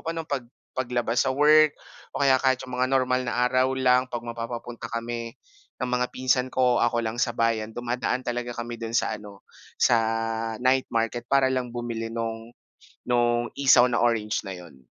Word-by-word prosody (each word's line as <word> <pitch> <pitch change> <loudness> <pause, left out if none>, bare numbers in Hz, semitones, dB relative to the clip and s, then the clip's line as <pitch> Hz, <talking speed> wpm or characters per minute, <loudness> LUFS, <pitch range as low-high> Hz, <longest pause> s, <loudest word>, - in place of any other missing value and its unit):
pa 165 - 0
no'n 165 -1 -5
pag 135 -3 -2 0.3
paglabas 120 -1 0
sa 130 - +1
work 150 +1 +6 0.4
o - - -3
kaya 135 -1 +5
kahit 130 -1 +2
yung 125 -1 -6
mga 130 0 +1
normal 130 -1 +2
na 125 - +1
araw 130 +1 +2
lang 125 0 +3
'pag 120 -1 -4
mapapapunta 120 0 -6
kami 115 0 -4 0.5
ng 125 - -1
mga 125 0 +1
pinsan 130 0 0
ko, 125 -2 +2
ako 120 -1 +1
lang 115 +2 -3
sa 120 -2 0
bayan, 110 -1 0
dumadaan 125 +1 -2
talaga 120 0 -3
kami 120 0 -6
do'n 115 0 -2
sa - - +1
ano, 100 -1 -13 0.3
sa 120 - +4 0.7
night 130 +1 +3
market 115 +1 -2
para 135 -1 +3
lang 130 -1 -1
bumili 115 -2 -4
nung 115 0 -5 0.6
nung 120 0 +2
isaw 130 -3 +6
na 120 - 0
orange 110 -3 0
na 95 - -5
yun. 85 -8 -13
120 Hz, 180 wpm, -25 LUFS, 115-130 Hz, 0.7 s, work